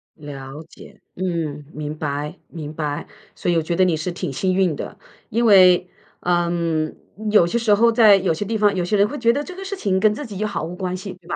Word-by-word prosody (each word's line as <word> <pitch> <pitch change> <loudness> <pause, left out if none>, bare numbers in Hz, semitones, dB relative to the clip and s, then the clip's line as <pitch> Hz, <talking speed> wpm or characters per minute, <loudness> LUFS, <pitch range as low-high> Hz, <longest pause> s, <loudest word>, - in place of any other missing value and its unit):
了 145 -1 -9
解， - - -15
嗯， 165 -5 -3
明 150 0 -5
白 150 +2 -3
明 155 -3 -8
白， 150 -2 -3 0.3
所 175 - -1
以 - - +1
我 - - +2
觉 170 +2 -2
得 185 - +4
你 175 -3 +2
是 160 +4 -3
挺 170 - -4
幸 185 +7 0
运 185 -3 +2
的。 - - -7 0.3
因 235 +2 +1
为， 185 -4 +6 0.3
嗯， 170 -3 0 0.4
有 210 -5 +6
些 175 +7 -1
时 230 -3 +3
候 230 +3 +4
在 225 -3 +7
有 190 -3 +1
些 185 +6 -4
地 220 +2 -1
方， 205 -1 +3
有 185 -2 -1
些 210 - 0
人 200 0 +4
会 290 +6 -6
觉 235 -1 +3
得 285 - -2
这 365 - -9
个 385 +1 -8
事 400 - -4
情 195 - 0
跟 210 +2 +4
自 295 - -6
己 205 -5 -8
又 215 +2 -1
毫 205 - -4
无 170 - -5
关 185 0 -3
系， 190 +1 -7
对 180 -2 -20
吧？ - - -2
180 Hz, 265 characters per minute, -21 LUFS, 160-210 Hz, 0.4 s, 在